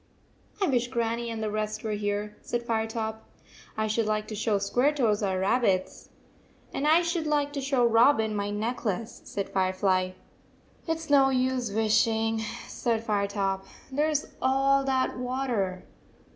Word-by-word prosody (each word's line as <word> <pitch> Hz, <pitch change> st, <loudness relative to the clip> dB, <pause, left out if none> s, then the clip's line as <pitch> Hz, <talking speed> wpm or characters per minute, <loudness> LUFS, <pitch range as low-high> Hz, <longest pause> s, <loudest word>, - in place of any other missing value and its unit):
" -, -, -29 dB
I -, -, +5 dB
wish 245 Hz, -6 st, +1 dB
Grannie 235 Hz, -1 st, -1 dB
and 225 Hz, -1 st, -4 dB
the 215 Hz, -, -1 dB
rest 215 Hz, 0 st, -3 dB
were 220 Hz, -, -2 dB
here," 205 Hz, 0 st, -2 dB
said 240 Hz, 0 st, -3 dB
Firetop. 220 Hz, -1 st, -2 dB, 0.3 s
" -, -, -22 dB
I 220 Hz, -, +1 dB
should 215 Hz, +1 st, 0 dB
like 215 Hz, 0 st, -1 dB
to 215 Hz, -, -4 dB
show 210 Hz, 0 st, +1 dB
Square 245 Hz, +9 st, +2 dB
toes 225 Hz, -7 st, +1 dB
our 190 Hz, -2 st, 0 dB
rabbits." 195 Hz, -1 st, 0 dB, 0.3 s
" -, -, -31 dB
And 290 Hz, -, -1 dB
I 325 Hz, +3 st, +5 dB
should 335 Hz, -2 st, -1 dB
like 290 Hz, -1 st, +1 dB
to 280 Hz, -, -3 dB
show 265 Hz, -2 st, +2 dB
Robin 225 Hz, -1 st, +4 dB
my 200 Hz, 0 st, -1 dB
necklace," 220 Hz, 0 st, -3 dB
said 200 Hz, -, -3 dB
Firefly. 185 Hz, -1 st, +1 dB, 0.7 s
"It 325 Hz, 0 st, 0 dB
s 320 Hz, -2 st, -8 dB
no 275 Hz, -2 st, +6 dB
use 255 Hz, -3 st, 0 dB
wishing," 220 Hz, +1 st, +2 dB, 0.3 s
said 225 Hz, -2 st, -1 dB
Firetop. 200 Hz, -2 st, 0 dB, 0.2 s
" -, -, -24 dB
There 295 Hz, +4 st, +1 dB
s 300 Hz, -1 st, 0 dB, 0.2 s
all 275 Hz, +1 st, +3 dB
that 260 Hz, -1 st, 0 dB
water." 245 Hz, -8 st, -2 dB
225 Hz, 170 wpm, -27 LUFS, 210-260 Hz, 0.7 s, no